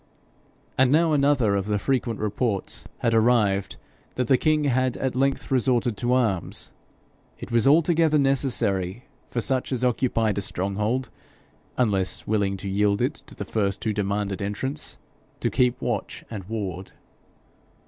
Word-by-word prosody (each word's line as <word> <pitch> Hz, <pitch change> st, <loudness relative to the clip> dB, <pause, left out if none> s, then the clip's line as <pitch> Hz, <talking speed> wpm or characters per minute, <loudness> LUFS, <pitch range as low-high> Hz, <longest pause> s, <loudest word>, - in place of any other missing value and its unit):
And 130 Hz, -1 st, +5 dB
now 160 Hz, +1 st, +4 dB
another 140 Hz, -8 st, +3 dB
of 100 Hz, 0 st, -1 dB
the 105 Hz, -1 st, +1 dB
frequent 120 Hz, 0 st, -1 dB
reports 105 Hz, -1 st, -2 dB
had 115 Hz, -1 st, +2 dB
arrived, 110 Hz, -4 st, +2 dB, 0.4 s
that 125 Hz, -, 0 dB
the 130 Hz, -, +4 dB
king 155 Hz, +3 st, +2 dB
had 130 Hz, -2 st, +1 dB
at 130 Hz, -2 st, -2 dB
length 135 Hz, +1 st, 0 dB
resorted 125 Hz, -3 st, +2 dB
to 120 Hz, +4 st, 0 dB
arms. 110 Hz, -9 st, 0 dB, 0.7 s
It -, -, -9 dB
was 120 Hz, +1 st, +3 dB
altogether 160 Hz, +1 st, +4 dB
necessary 120 Hz, -7 st, 0 dB, 0.2 s
for 120 Hz, -, -2 dB
such 130 Hz, +3 st, 0 dB
as 130 Hz, -1 st, -1 dB
occupied 115 Hz, -4 st, +1 dB
a -, -, -2 dB
stronghold, 105 Hz, +6 st, -1 dB, 0.7 s
unless 100 Hz, -6 st, +1 dB
willing 100 Hz, -2 st, 0 dB
to 100 Hz, -, -7 dB
yield 100 Hz, +1 st, +1 dB
it -, -, +1 dB
to -, -, -13 dB
the -, -, -5 dB
first 100 Hz, -3 st, -1 dB
who 110 Hz, -, 0 dB
demanded 100 Hz, -1 st, -2 dB
entrance, 130 Hz, +9 st, -3 dB, 0.4 s
to -, -, -1 dB
keep 125 Hz, -1 st, +2 dB
watch -, -, -3 dB
and 100 Hz, -5 st, -6 dB
ward. 95 Hz, -3 st, -5 dB
115 Hz, 150 wpm, -25 LUFS, 100-130 Hz, 0.7 s, And